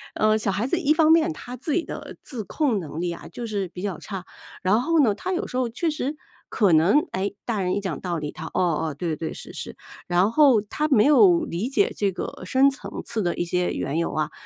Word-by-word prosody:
呃， 215 0 +3
小 210 -2 0
孩 200 +4 -1
子 335 +7 0
一 305 -4 +1
方 315 0 +5
面 325 0 +4
他 250 -4 -8
自 270 +5 -4
己 340 +3 +1
的 - - -8
自 240 -6 -5
控 265 -6 0
能 160 -2 -6
力 175 0 -1
啊 170 - -10
就 240 - -7
是 205 -4 -2
比 180 +2 -9
较 195 -4 -3
差， 190 -3 -7 0.4
然 200 +5 +3
后 330 +4 +2
呢， 225 -7 +4
他 370 - -4
有 360 - -1
时 - - -8
候 255 -2 +1
确 250 +9 -2
实 300 -1 -3 0.3
可 200 -7 +3
能， 165 - +5
诶， 200 +2 -2
大 220 -4 -1
人 180 -1 0
一 - - 0
讲 190 -6 -4
道 175 -2 -2
理， 150 -1 -4
他， - - -8
哦， 160 -3 +1
哦， 145 - -7
对 165 0 -2
对， 160 +1 -4
是 - - -10
是。 - - -7 0.3
然 180 +4 +3
后 275 -4 +6
他 260 +9 -2
没 265 -8 +4
有 340 +4 +6
理 185 +9 -3
解 295 +9 +2
这 200 -2 +1
个 185 - -6
深 265 +9 +4
层 270 - -7
次 225 -2 -2
的 175 -3 0
一 175 - -1
些 180 +1 0
缘 150 +4 -2
由 170 - -1
啊， 155 -1 -1
210 Hz, 265 characters per minute, -24 LUFS, 180-275 Hz, 0.4 s, 后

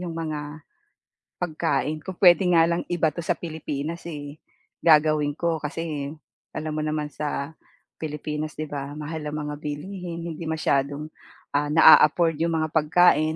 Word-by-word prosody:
'yong 175 -2 -4
mga 155 -1 -3 1.0
pagkain. 155 -2 -1
Kung 190 - -6
puwede 180 0 +7
nga 165 - +7
lang 170 - 0
ibato 165 0 0
sa 165 - 0
Pilipinas 160 0 -5
eh, 145 -1 -7 0.4
gagawin 150 -2 +4
ko 165 -1 -1
kasi 150 -2 -3 0.5
alam 155 0 -3
mo 155 - -3
naman 150 -1 -2
sa 145 0 -3 0.5
Pilipinas 150 0 -4
'di 155 - -4
ba, 145 0 -6
mahal 155 +1 -5
ang 150 - -4
mga 150 0 -4
bilihin 170 +4 -6
hindi 170 0 -6
masyadong, 150 -1 -1 0.4
ah, 145 +1 +1
na-a-afford 165 +1 +6
'yong 165 0 +1
mga 155 - -2
pagkain, 160 0 +4
155 Hz, 145 wpm, -25 LUFS, 150-165 Hz, 1.0 s, puwede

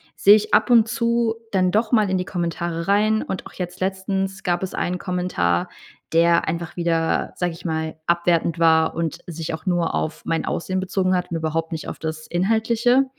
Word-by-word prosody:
sehe 205 +1 +7
ich 215 0 -1
ab - - +4
und 230 -2 +6
zu 235 -1 +1 0.2
dann 185 -2 +2
doch 220 +2 +1
mal 215 -5 +3
in 190 - +2
die 180 - -2
Kommentare 170 -2 -3
rein. 215 +2 +3
Und 190 - -5
auch - - -17
jetzt 180 -1 -6
letztens 190 0 -2
gab 175 -1 0
es 190 - -4
einen 180 0 -2
Kommentar, 180 - 0 0.5
der 170 +1 +4
einfach 165 +1 -3
wieder, 165 -2 0
sage 175 -2 -1
ich 165 - -12
mal, 160 -1 -2
abwertend 170 -1 +1
war 160 -1 +4
und 165 0 -2
sich 165 -1 -5
auch 160 0 -7
nur 175 -2 0
auf 155 - -3
mein 165 - -1
Aussehen 185 +2 -2
bezogen 185 0 0
hat 180 -1 -2
und 165 - -1
überhaupt 160 +1 -2
nicht 160 -1 -5
auf - - -6
das 155 -1 -5
Inhaltliche. 225 +7 +2
180 Hz, 195 wpm, -22 LUFS, 165-195 Hz, 0.5 s, sehe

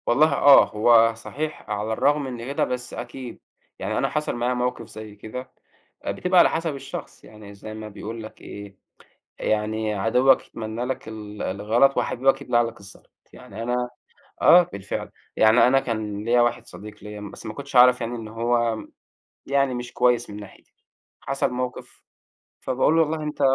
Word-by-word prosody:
والله 150 +7 +4
آه، 140 -1 +8
هو 115 +1 +5
صحيح 150 +7 -6
على 105 +1 -2
الرغم 145 +5 +2
من 125 -3 -6
كده 140 +2 -1
بس 125 -1 -3
أكيد، 125 0 -7 0.4
يعني - - -2
أنا - - +1
حصل 150 -4 -2
معايا 120 +1 0
موقف 125 0 -2
زي 110 -1 -10
كده، 125 +5 -8 0.6
بتبقى 180 0 +2
على - - +7
حسب 160 -2 -2
الشخص 135 0 -8
يعني 105 -1 -13
زي 105 +2 -9
ما 110 0 -7
بيقول 110 +2 -7
لك 110 - -12
إيه، 100 -1 -10 0.6
يعني 110 0 -1
عدوك 125 +6 +3
يتمنّى 110 +1 -5
لك 130 -2 -4
ال 105 -1 -8
الغلط 110 +8 +2
وحبيبك 135 +2 +1
يبلع 120 -3 +2
لك 115 -1 -5
الزلط، 100 0 -14 0.2
يعني 110 +3 -9
أنا 125 +1 -1 0.5
آه، 180 - +8
بالفعل 100 0 -5 0.3
يعني 110 +3 +6
أنا 135 +2 +4
كان 105 -4 -4
ليَّ 120 +2 +3
واحد 120 0 +1
صديق 105 0 -11
ليَّ 105 0 -8
بس 105 -1 -9
ما 110 - -5
كنتش 140 +1 -6
اعرف 125 0 +7
يعني 120 +1 -3
إن 110 -2 -7
هو 115 0 0 0.7
يعني 140 -1 +1
مش 120 -1 -6
كويّس 120 -1 +2
من 105 - -8
ناحيتي، 100 -2 -14 0.5
حصل 135 -1 -1
موقف 125 0 -5 0.6
فباقول 130 +4 +1
له 165 - +5
والله 155 0 -1
أنت 150 -1 -5
120 Hz, 170 wpm, -24 LUFS, 110-130 Hz, 0.7 s, آه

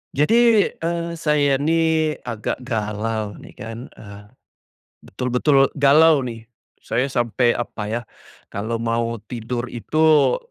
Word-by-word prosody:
Jadi, 225 - +4
eee, 170 0 -3
saya 145 -3 +2
nih 160 0 +1
agak 120 +1 -4
galau 110 -2 -3
nih - - -13
kan, 115 +1 -7
eee, 100 -1 -12 0.8
betul-betul 130 +5 +2
galau 145 0 +5
nih. 115 -1 -8 0.3
Saya 125 - -1
sampai 120 -2 +1
apa 115 -2 -5
ya, 115 +3 -3 0.5
kalo 110 +3 -3
mau 115 0 -1
tidur 120 0 -4
itu 155 - +2
125 Hz, 115 wpm, -21 LUFS, 115-150 Hz, 0.8 s, galau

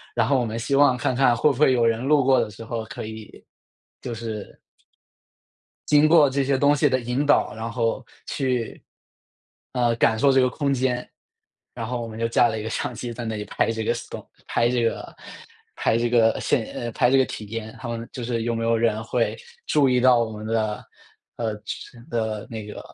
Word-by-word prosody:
然 115 -2 +2
后 135 -1 +3
我 125 - 0
们 110 +1 -4
希 115 +4 -3
望 135 -3 +5
看 125 - -1
看 125 -2 +4
会 150 +5 +4
不 135 - -4
会 140 -1 +4
有 120 -2 +2
人 115 +1 +1
路 145 0 +3
过 130 0 +4
的 - - -1
时 110 +3 -10
候 115 -1 -4
可 110 - -7
以 110 -1 -10 0.6
就 120 - -5
是 110 -2 -7 1.3
经 150 +1 +5
过 155 -4 +6
这 140 +1 0
些 135 0 +1
东 145 +2 +4
西 145 0 +3
的 130 -1 +1
引 125 +4 -1
导， 145 -6 +3
然 115 +1 -4
后 115 +1 -1 0.2
去 125 -4 -2 0.9
呃 120 -2 +2
感 110 -1 +2
受 135 +4 +4
这 130 -1 +4
个 125 - +3
空 140 +1 -1
间。 125 -1 -1 0.7
然 115 -2 -5
后 125 -1 -3
我 115 - -5
们 110 0 -9
就 115 - +1
架 115 +1 +4
了 110 -1 -3
一 - - -5
个 110 - -4
相 120 - -3
机 120 +1 -6
在 120 0 -6
那 110 -1 -3
里 105 - -4
拍 115 - 0
这 110 -1 -3
个 115 - +1
Stone， 115 - -8 0.2
拍 120 0 +2
这 120 -1 +1
个 115 - -2 0.6
拍 115 - +1
这 120 +1 +1
个 115 -2 +3
现 120 -6 +1
呃 120 -1 -4
拍 125 0 +2
这 135 - +4
个 130 - +4
体 110 -1 -7
验， 110 0 -6
他 120 - -5
们 115 0 -5
就 125 - -5
是 115 -1 -2
有 120 - -1
没 115 - -2
有 115 0 +2
人 110 -1 0
会 115 +1 0 0.3
注 140 -3 +3
意 125 -1 +3
到 125 -1 +5
我 115 -1 -1
们 105 0 -8
的 110 -1 -1 0.5
呃 110 -3 -2 0.6
的 110 -2 -2
那 110 -2 -6
个 105 - -8
120 Hz, 250 characters per minute, -24 LUFS, 115-130 Hz, 1.3 s, 过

